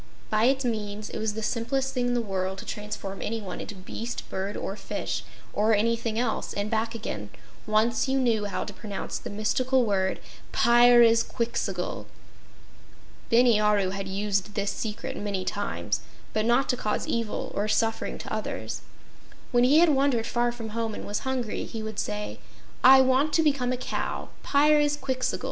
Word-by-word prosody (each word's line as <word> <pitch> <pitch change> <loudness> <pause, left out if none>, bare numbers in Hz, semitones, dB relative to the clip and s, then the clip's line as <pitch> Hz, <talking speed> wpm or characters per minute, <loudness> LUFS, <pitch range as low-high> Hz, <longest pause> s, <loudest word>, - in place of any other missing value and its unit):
By 215 +1 +3
its 265 +1 +2
means, 215 -2 -3
it - - -4
was 215 -1 -1
the 220 - -4
simplest 260 +4 -1
thing 250 -1 0
in 245 - +1
the 240 - +1
world 190 -2 -2
to - - -8
transform 210 -2 -5
anyone 215 -4 -4
into 210 - -7
beast, 225 +5 -6
bird 195 +2 -3
or 195 - -4
fish, - - -4 0.3
or 215 +1 +3
anything 230 +1 0
else, 235 -1 -1
and 205 +2 -2
back 225 +1 0
again, 105 - -5 0.4
once 220 +4 +2
you 265 0 +2
know 230 -5 +2
how 200 - -2
to - - -7
pronounce 205 -3 -5
the - - -7
mystical 250 +5 +1
word: 190 -3 0 0.3
"Pyrzqxgl." 235 -4 +3 1.2
Bini 235 -2 +5
Aru 210 -3 +3
had 195 0 -4
used 200 +1 -1
this 200 -1 0
secret 215 0 -4
many 200 -3 -2
times, 205 0 -2 0.3
but 215 0 +1
not 240 +3 +3
to 250 - +3
cause 210 - -1
evil 230 -2 -2
or 205 +1 -1
suffering 225 +1 0
to - - -6
others. - - -4 0.7
When 245 -1 +4
he 280 +4 +5
had 340 0 +6
wandered 270 -5 +2
far 240 +1 +1
from 235 -2 -7
home 225 0 -2
and - - -7
was 205 - -2
hungry, 260 -4 -2
he 225 -2 -6
would 220 -1 -4
say: 105 0 -3 0.4
"I 265 +1 +9
want 265 +4 +3
to 325 - +4
become 275 -5 +2
a 255 - 0
cow - - -3 0.2
Pyrzqxgl!" 290 -3 +2
225 Hz, 170 wpm, -27 LUFS, 205-245 Hz, 1.2 s, I